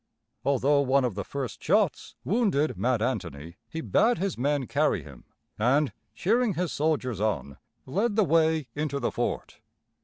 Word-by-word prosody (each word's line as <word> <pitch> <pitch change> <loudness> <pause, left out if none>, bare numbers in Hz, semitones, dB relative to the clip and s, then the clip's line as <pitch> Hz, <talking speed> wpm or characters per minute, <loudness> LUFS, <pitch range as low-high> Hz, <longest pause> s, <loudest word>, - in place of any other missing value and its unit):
Although 140 +1 +3
one 135 -1 +3
of 120 - -1
the 100 +1 -4
first 135 +4 -5
shots 200 -1 +1
wounded 195 - +1
Mad 120 -3 +1
Anthony, 85 - -4
he 160 - -4
bade 235 +7 +3
his 195 0 -1
men 140 +2 0
carry - - +1
him, - - -13 0.3
and, 135 +6 +2 0.2
cheering 225 +1 +1
his 175 0 -1
soldiers 140 -8 -1
on, 105 - -2 0.3
led 205 - 0
the 215 - +4
way 160 -4 +2
into 145 -1 -2
the 125 - -1
fort. - - -3
145 Hz, 155 wpm, -27 LUFS, 125-175 Hz, 0.3 s, the